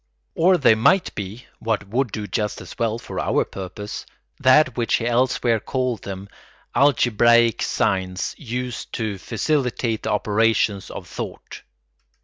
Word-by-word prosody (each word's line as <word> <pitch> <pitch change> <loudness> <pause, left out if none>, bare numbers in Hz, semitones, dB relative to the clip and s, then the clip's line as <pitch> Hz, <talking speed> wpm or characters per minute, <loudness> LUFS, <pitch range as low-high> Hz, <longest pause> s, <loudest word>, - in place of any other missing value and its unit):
Or 180 +2 +4
they 135 - +5
might 175 - +3
be 105 +5 -6
(what 110 -3 -1
would 125 +1 0
do 105 -1 -4
just 105 0 -2
as - - -10
well 115 -1 0
for - - -6
our - - +1
purpose) 95 +2 -7 0.4
that 130 -1 +5
which 120 -2 +1
he 115 - -1
elsewhere 120 -1 +2
called 125 -3 -2
them, 95 0 -7 0.5
algebraic 120 -4 +4
signs 95 -3 -1
used 125 -1 -5
to 110 -5 -3
facilitate 115 - -1
the - - -3
operations 105 -1 +1
of - - -8
thought. - - -7
115 Hz, 135 wpm, -22 LUFS, 105-125 Hz, 0.5 s, they